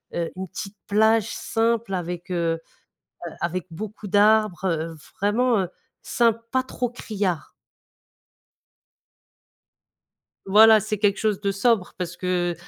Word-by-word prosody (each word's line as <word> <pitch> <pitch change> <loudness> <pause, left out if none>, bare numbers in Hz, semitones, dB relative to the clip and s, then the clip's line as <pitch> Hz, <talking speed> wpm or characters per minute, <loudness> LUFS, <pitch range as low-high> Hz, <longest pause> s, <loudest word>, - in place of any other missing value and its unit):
heu, 170 -1 -2
une 190 +1 -5
petite 195 +3 -8
plage 220 +1 +3
simple 230 -2 -1
avec, 175 0 -4
heu 165 -2 0 0.7
heu, 170 - -6
avec 175 +1 -2
beaucoup 210 +4 -7
d'arbres, 205 -2 +3
heu, 165 -2 -1 0.2
vraiment, 225 +2 +2
heu, 180 - -3 0.3
simple, 230 -1 +1
pas 260 0 +1
trop 250 -1 -3
criard. 200 -8 -3 2.9
Voilà 220 +3 +7
c'est 215 +1 -3
quelque 205 -1 +2
chose 210 -3 0
de 200 -1 0
sobre, 195 -1 +1
parce 180 -1 -5
que 180 -1 0
200 Hz, 125 wpm, -24 LUFS, 180-220 Hz, 2.9 s, Voilà